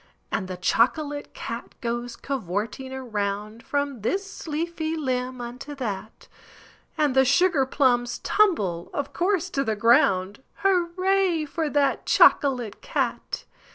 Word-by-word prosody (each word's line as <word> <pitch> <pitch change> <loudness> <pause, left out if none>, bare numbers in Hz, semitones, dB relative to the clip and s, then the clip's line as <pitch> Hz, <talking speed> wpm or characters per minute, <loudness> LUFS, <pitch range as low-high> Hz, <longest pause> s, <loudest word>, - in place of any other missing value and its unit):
And 185 - -1
the 185 -1 -5
chocolate 290 - +1
cat 230 +1 -6
goes 240 0 -3
covorting 230 +1 -3
around 215 -3 -3
From 285 -4 -2
this 390 - -3
leafy 320 +1 -2
limb 255 -3 -2
unto 250 +5 -7
that, 215 -5 -5 0.7
And 295 -4 +2
the 265 - +6
sugar 275 +1 +3
plums 245 -3 +2
tumble, 200 - +1
of 285 -1 -3
course, 370 0 0
to 275 - 0
the 220 -4 -1
ground 210 -3 +3 0.2
Hurray 370 -2 +2
for 310 +1 -2
that 285 -1 +1
chocolate 250 -8 +4
cat! - - -2
265 Hz, 120 wpm, -25 LUFS, 230-315 Hz, 0.7 s, the